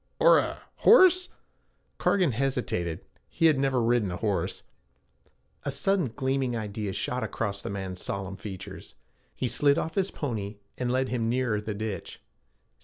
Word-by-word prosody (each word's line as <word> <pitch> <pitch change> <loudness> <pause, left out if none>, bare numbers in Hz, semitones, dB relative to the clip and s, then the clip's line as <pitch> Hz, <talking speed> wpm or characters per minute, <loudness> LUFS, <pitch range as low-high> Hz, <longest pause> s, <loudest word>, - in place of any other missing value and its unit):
'Or - - +7
a - - -3 0.2
horse?' 370 -4 +6 0.7
Cargan 180 -7 +3
hesitated. 115 -10 -2 0.2
He 165 - 0
had 155 -4 +5
never 135 -2 +2
ridden 115 -4 +2
a 90 - -4
horse. - - -2 1.0
A - - -2
sudden 175 +4 +1
gleaming 130 -3 0
idea 105 -2 -4
shot 125 +6 -2
across 100 -3 -3
the - - -5
man's 95 -2 -5
solemn 95 -1 -4
features. 95 -3 -9 0.4
He 130 - -1
slid 140 +3 +3
off 160 - -2
his 195 +1 +1
pony 110 - -4 0.2
and 125 -1 -2
led 130 +1 +1
him 115 -2 -1
nearer 120 -4 0
the 105 0 -4
ditch. 105 -3 -5
120 Hz, 150 wpm, -27 LUFS, 100-140 Hz, 1.0 s, Or